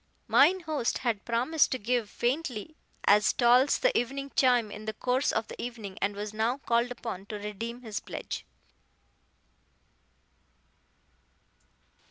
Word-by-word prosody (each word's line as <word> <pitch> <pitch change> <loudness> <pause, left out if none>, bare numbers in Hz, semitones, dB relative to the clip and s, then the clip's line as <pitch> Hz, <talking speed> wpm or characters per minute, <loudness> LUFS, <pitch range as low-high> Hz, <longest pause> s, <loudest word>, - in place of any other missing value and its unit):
Mine 375 0 +5
host 310 -7 -1
had 230 -5 -2
promised 250 +7 +2
to 260 - 0
give 235 -1 -1
Faintly 255 +2 -2 0.3
as 210 +1 +5
Tolls 250 +3 +4
the - - +2
Evening 275 +3 -1
Chime 245 -5 +3
in 215 +1 -8
the 220 - -3
course 255 +5 +1
of 220 0 -1
the - - -8
evening, 225 -6 -6
and 200 +1 0
was 210 +1 -5
now 225 +4 0
called 235 -2 +1
upon 230 -5 -6
to 215 - -5
redeem 225 +4 -6
his 220 -3 -4
pledge. - - -6
235 Hz, 135 wpm, -29 LUFS, 215-260 Hz, 0.3 s, Mine